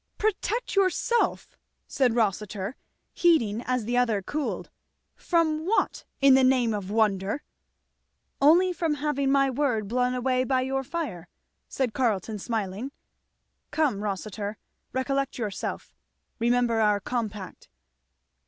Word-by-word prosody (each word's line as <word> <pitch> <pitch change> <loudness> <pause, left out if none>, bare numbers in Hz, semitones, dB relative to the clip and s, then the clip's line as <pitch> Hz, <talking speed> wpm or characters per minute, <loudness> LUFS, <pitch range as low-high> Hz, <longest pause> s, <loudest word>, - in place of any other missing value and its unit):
"Protect 435 +3 -1
yourself!" 395 +5 +1 0.3
said 255 -5 +1
Rossitur, 210 0 -1 0.4
heating 235 -11 +3
as 250 -3 0
the 240 +2 0
other 225 -5 +2
cooled, 295 +7 -3 0.4
from 315 -3 +1
what, 405 +7 0 0.2
in 275 -1 +7
the 265 0 +6
name 255 -3 +3
of 200 -2 -4
wonder?" 210 +2 +1 1.0
"Only 350 +6 +5
from 330 -3 0
having 280 -2 0
my 275 -1 +3
word 250 -6 0
blown 250 +3 +1
away 255 0 +1
by 255 0 +1
your 270 +1 -1
fire," 245 - -4 0.4
said 255 -5 -1
Carleton, 220 -4 0
smiling. 220 +3 -3 0.8
"Come, 285 -11 +1
Rossitur, 205 +1 -4 0.3
recollect 275 +1 -1
yourself 210 -5 -4 0.5
remember 235 -1 +2
our 210 -2 +3
compact." 210 - -5
250 Hz, 115 wpm, -26 LUFS, 215-280 Hz, 1.0 s, in